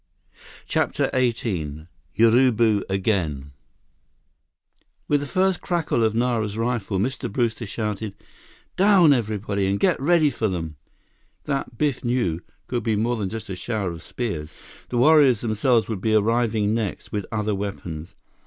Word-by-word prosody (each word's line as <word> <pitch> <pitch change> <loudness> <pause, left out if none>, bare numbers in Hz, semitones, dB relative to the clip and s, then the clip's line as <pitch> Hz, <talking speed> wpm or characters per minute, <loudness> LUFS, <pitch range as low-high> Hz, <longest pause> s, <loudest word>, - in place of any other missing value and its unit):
CHAPTER - - 0
XVIII 95 - -1 0.3
Urubu 115 -2 +4
Again 90 -9 -1 1.6
With 145 - +3
the 145 - -5
first 185 +2 +1
crackle 165 -9 0
of 110 -1 +1
Nara's 115 -3 0
rifle, 115 -4 -1
Mr. 125 +3 -2
Brewster 115 -1 -1
shouted, 105 -1 -4 0.6
"Down 190 -6 +6
everybody—and 100 -4 -1
get - - +2
ready 155 0 +4
for 115 -3 -1
them!" 80 -5 -4 0.7
That, 135 -4 -3
Biff 145 -2 0
knew, 120 -10 0 0.2
could 120 -1 -2
be 110 -2 0
more 115 +4 0
than 105 -4 -3
just 110 +1 -6
a 95 - -5
shower 100 -1 -3
of 85 -1 -8
spears. 80 -9 -5 0.3
The 125 - -2
warriors 140 -3 +5
themselves 115 +1 +2
would 110 -5 -4
be 110 0 +2
arriving 110 -1 +2
next, 110 -4 -3
with 105 -2 -3
other 105 -1 -1
weapons. 90 -5 -5
110 Hz, 135 wpm, -23 LUFS, 100-125 Hz, 1.6 s, Down